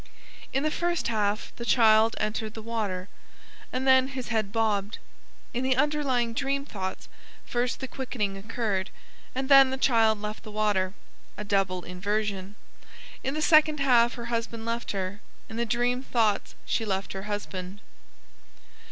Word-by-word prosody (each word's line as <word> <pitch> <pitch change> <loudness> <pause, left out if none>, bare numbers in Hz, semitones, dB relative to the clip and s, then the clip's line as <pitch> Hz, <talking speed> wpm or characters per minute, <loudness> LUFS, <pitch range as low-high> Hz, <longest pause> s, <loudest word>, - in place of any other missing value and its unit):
In 270 +2 0
the 310 - +1
first 345 -4 -1
half 210 -2 -1
the 235 - -5
child 225 -2 +5
entered 215 0 -2
the 220 - -6
water, 205 -5 -3 0.6
and 255 +1 -2
then 260 -1 +6
his 260 -2 -6
head 220 -4 0
bobbed; 215 -2 0 0.6
in 245 - -1
the 260 0 +2
underlying 265 -4 +1
dream 275 +2 -1
thoughts 190 -8 -5 0.4
first 245 0 -1
the 265 - -4
quickening 235 -6 -3
occurred, 200 -2 -2 0.5
and 265 +1 -1
then 275 -1 +8
the 265 - -2
child 225 -5 +3
left 210 +1 -5
the - - -10
water 205 -3 0 0.4
(a 210 - -4
double 195 -3 0
inversion). 200 +1 -2 0.7
In 270 +2 -1
the 310 - -1
second 310 -2 +5
half 245 -3 +4
her 235 - -6
husband 230 -1 -2
left 230 +1 -2
her; 195 +1 -4 0.3
in 220 - -7
the 235 0 0
dream 245 +2 +1
thoughts 225 -6 0
she 225 - 0
left 195 -2 -2
her 195 +2 -6
husband. 195 -2 -5
225 Hz, 155 wpm, -27 LUFS, 205-255 Hz, 0.7 s, then